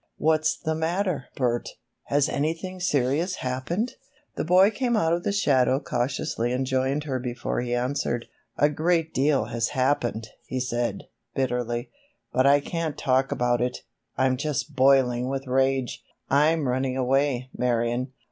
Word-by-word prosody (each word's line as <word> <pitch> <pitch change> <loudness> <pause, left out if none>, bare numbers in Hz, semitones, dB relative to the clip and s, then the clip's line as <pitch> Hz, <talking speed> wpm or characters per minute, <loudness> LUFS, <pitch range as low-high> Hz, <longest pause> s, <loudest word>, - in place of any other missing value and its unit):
What's 155 0 +2
the 160 - -2
matter, 165 -2 -1
Bert? 120 -2 0 0.4
Has 145 0 +2
anything 165 +5 -2
serious 155 +2 +1
happened?" 140 - -3 0.4
The - - -2
boy 185 +5 +5
came 240 +1 0
out 165 -5 +2
of 170 - 0
the - - 0
shadow 135 -9 +3
cautiously 120 -3 -2
and 130 +1 0
joined 130 +2 0
her 135 -4 -2
before 120 -1 -3
he 120 0 -1
answered. 120 -1 -1 0.3
"A 145 - +5
great 160 +2 0
deal 140 +1 +2
has 115 0 -1
happened," 120 -4 0 0.2
he 130 - -2
said, 120 -1 -2 0.3
bitterly; 125 -2 -1 0.4
"but 130 +2 +4
I 145 +1 +5
can't 165 -1 -3
talk 130 +1 +1
about 120 0 +1
it. 125 0 -2 0.3
I'm 130 -1 +2
just 150 +1 -3
boiling 130 -2 +4
with 135 0 -3
rage! 130 0 0 0.3
I'm 150 +1 +3
running 130 +1 0
away, 130 0 +1
Marion." 120 +1 0
135 Hz, 145 wpm, -25 LUFS, 125-155 Hz, 0.4 s, boy